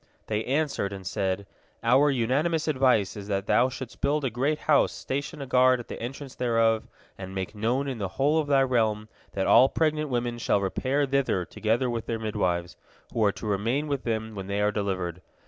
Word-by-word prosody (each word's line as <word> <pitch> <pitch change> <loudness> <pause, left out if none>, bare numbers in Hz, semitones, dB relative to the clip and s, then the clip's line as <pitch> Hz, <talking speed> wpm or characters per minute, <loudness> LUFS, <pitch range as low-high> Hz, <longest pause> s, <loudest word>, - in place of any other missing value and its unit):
They 110 0 -1
answered, 140 -8 -1
and 95 -1 -8
said: 95 +1 -2 0.4
"Our 130 +5 +5
unanimous 140 +6 +1
advice 130 -9 +2
is 100 -1 -8
that 100 -1 -1
thou 125 +4 +3
shouldst 130 -2 -8
build 145 0 +1
a 130 - -1
great 135 +6 0
house, 150 -2 +3
station 140 +2 -4
a - - -6
guard 130 0 +4
at 120 - -9
the - - -7
entrance 135 +3 -6
thereof, 115 -2 +1 0.3
and 95 0 -7
make 95 +2 -3
known 120 +6 0
in 130 -4 -4
the 100 - -1
whole 145 +4 +3
of 155 - -1
thy 135 -1 +4
realm 110 -4 0 0.2
that 95 - -1
all 130 +3 +6
pregnant 155 -2 0
women 120 -1 -2
shall 105 - +2
repair 130 +9 0
thither 135 -9 0
together 115 +8 0
with 115 -2 -3
their 115 - -1
midwives, 90 -6 -2 0.4
who 115 - +1
are 100 - +4
to - - -9
remain 115 +8 0
with 140 -2 -1
them 110 -1 -2
when 95 -2 -6
they 100 0 -2
are 105 0 +2
delivered. 95 -4 -3
120 Hz, 200 wpm, -27 LUFS, 105-135 Hz, 0.4 s, all